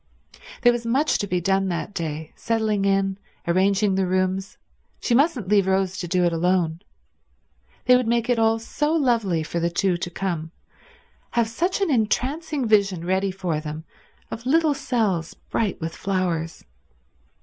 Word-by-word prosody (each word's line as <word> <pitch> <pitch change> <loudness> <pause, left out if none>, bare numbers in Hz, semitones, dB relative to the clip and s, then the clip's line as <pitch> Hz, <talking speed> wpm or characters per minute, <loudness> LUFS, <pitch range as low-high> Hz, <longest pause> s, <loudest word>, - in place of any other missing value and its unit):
There 240 - +7
was 240 -1 -3
much 260 +6 +1
to 205 - -2
be 180 -1 0
done 195 +2 +1
that 175 +3 -3
day, 160 -3 -4
settling 220 -3 0
in, 195 0 +1 0.3
arranging 195 +3 +2
the 190 -1 +1
rooms; 185 +1 -1 0.4
she 240 - 0
mustn't 270 - +2
leave 200 -1 +3
Rose 190 -1 +1
to 175 - -4
do 180 +1 +1
it 170 - +1
alone. 170 -1 +1 1.1
They 250 - +7
would 250 -2 +1
make 235 0 +1
it 245 -2 +2
all 225 0 +3
so 295 +7 -1
lovely 230 - +1
for 170 +2 -3
the 170 0 +1
two 180 +1 +1
to 175 - -4
come, 170 -3 -3 0.9
have 235 -1 +3
such 350 - -1
an 385 -5 +2
entrancing 270 +4 0
vision 200 -5 +2
ready 190 +2 +1
for 185 -5 -2
them 155 +1 -6 0.5
of 235 +2 -6
little 315 +1 +3
cells 215 - -1
bright 210 -4 -2
with 165 0 -4
flowers. 180 -4 -2
195 Hz, 160 wpm, -23 LUFS, 175-235 Hz, 1.1 s, There